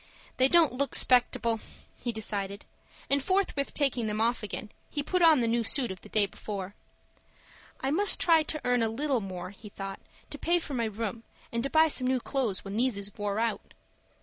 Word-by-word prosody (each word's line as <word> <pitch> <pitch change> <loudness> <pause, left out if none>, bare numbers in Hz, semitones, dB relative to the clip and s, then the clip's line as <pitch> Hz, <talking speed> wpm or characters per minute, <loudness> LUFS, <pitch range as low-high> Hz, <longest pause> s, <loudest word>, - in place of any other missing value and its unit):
"They 260 - +5
don't 325 -2 +4
look 275 +2 0
'spectable," 235 -2 +4 0.4
he 240 - -1
decided; 205 -2 -3 0.4
and, 280 0 +2
forthwith 375 -7 0
taking 260 -6 0
them 210 0 -2
off 235 +2 +1
again, 210 +1 -6 0.2
he 290 - -2
put 365 +4 0
on 320 -6 +6
the 230 - +1
new 230 +1 +1
suit 245 -1 +1
of 185 - -9
the - - -14
day 215 -2 +3
before. 200 -1 -6 1.1
"I 270 - -1
must 400 +7 +5
try 330 -2 +5
to 305 0 -3
earn 245 -1 +2
a 225 - +2
little 265 +1 -1
more," 185 -2 -6
he 210 +1 -12
thought, 195 -1 -7 0.3
"to - - -5
pay 345 +1 +2
for 320 -4 -5
my 235 -3 0
room, 225 +1 -4 0.3
and 235 - -1
to 275 - -2
buy 315 +2 +5
some 260 -4 0
new 260 0 +1
clo'es 240 -7 -2
when 195 +2 -5
these 245 -2 +2
is 200 0 -7
wore 205 -1 -3
out." 230 0 -2
235 Hz, 200 wpm, -28 LUFS, 210-280 Hz, 1.1 s, on